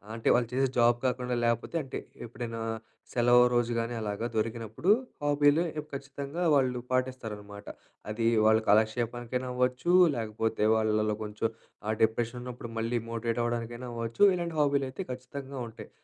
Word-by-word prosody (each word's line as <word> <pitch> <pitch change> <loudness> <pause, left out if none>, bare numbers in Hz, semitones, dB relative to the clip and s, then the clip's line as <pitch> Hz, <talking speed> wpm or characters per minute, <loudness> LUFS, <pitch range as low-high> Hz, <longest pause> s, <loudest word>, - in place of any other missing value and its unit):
అంటే 115 - -4
వాళ్ళు 120 -2 +2
చేసే 135 +1 +2
జాబ్ 120 0 +5
కాకుండా 125 -1 0
లేకపోతే 115 +7 0
అంటే 135 - -5 0.3
ఎప్పుడైనా 115 -1 -6 0.5
సెలవు 120 0 +6
రోజు 120 0 +2
గాని 115 +1 -2
అలాగ 105 0 -3
దొరికినప్పుడు, 115 - -2 0.3
హాబీలు 145 +2 +4 0.3
ఖచ్చితంగా 140 +4 -5
వాళ్ళు 130 -2 +2
పాటిస్తారన్నమాట. 110 -6 -3 0.5
అది 115 +1 0 0.2
వాళ్ళ 110 0 +6
కాలక్షేపానికైనా 120 +4 +1
అవ్వచ్చు, 125 +6 +1 0.3
లేకపోతే 110 -1 -1
వాళ్ళలో 110 -1 +1
కొంచెం 105 +1 -2 0.4
ఆ - - +1
డిప్రెషన్ 115 +2 0
ఉన్నప్పుడు 125 -1 -7
మళ్ళీ 115 +1 0
మోటివేట్ 115 0 -1
అవ్వడానికైనా 120 +1 -3
అవ్వచ్చు. 115 - 0
ఇలాంటి 170 -2 -3
హాబీలు 140 -2 +2
అయితే 160 +9 -5
ఖచ్చితంగా 130 +2 -7
ఉంటాయి. 110 - -11
120 Hz, 135 wpm, -29 LUFS, 115-130 Hz, 0.5 s, సెలవు